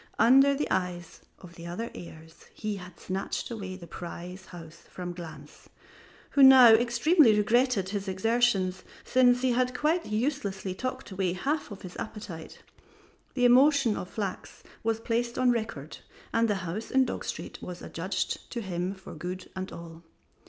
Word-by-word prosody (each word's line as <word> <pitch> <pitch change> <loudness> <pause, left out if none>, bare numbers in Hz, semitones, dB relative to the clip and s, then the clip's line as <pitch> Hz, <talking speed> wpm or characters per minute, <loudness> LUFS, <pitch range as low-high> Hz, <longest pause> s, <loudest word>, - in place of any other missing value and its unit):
Under 270 +5 +6
the 295 - -1
eyes 180 -2 -3 0.2
of 175 -2 -12
the 170 0 -10
other 205 +7 -5
heirs 160 -1 -12
he 215 -2 -3
had 180 -2 -11
snatched 190 +5 -4
away 195 -5 -5
the 180 -2 -10
prize 180 +2 -8
house 170 -2 -11
from 180 -1 -6
Glanz, 155 -4 -11 0.6
who 280 - +3
now 265 -3 +10
extremely 235 - +5
regretted 220 -2 +2
his 200 0 -4
exertions, 190 -1 +1 0.2
since 250 -1 +3
he 260 - +3
had 250 +1 0
quite 325 +3 +1
uselessly 215 -5 -2
talked 255 +2 -5
away 190 -2 -1
half 285 +12 -2
of 205 -2 -10
his 180 -1 -9
appetite. 185 -7 -8 0.7
The 250 -2 +2
emotion 260 -2 +5
of 180 - -6
Flachs 200 -4 -5 0.2
was 225 0 0
placed 235 +1 -2
on 255 -1 +4
record 220 - -4 0.3
and 230 0 +3
the 210 - +1
house 195 +7 -5
in 265 0 +3
Dog 240 - -4
Street - - -6
was 180 -1 -8
adjudged 185 +3 -3
to 235 - -3
him 185 -1 -3
for 190 - -11
good 180 +4 -7
and 185 0 -5
all. 165 -1 -10
205 Hz, 160 wpm, -28 LUFS, 180-245 Hz, 0.7 s, now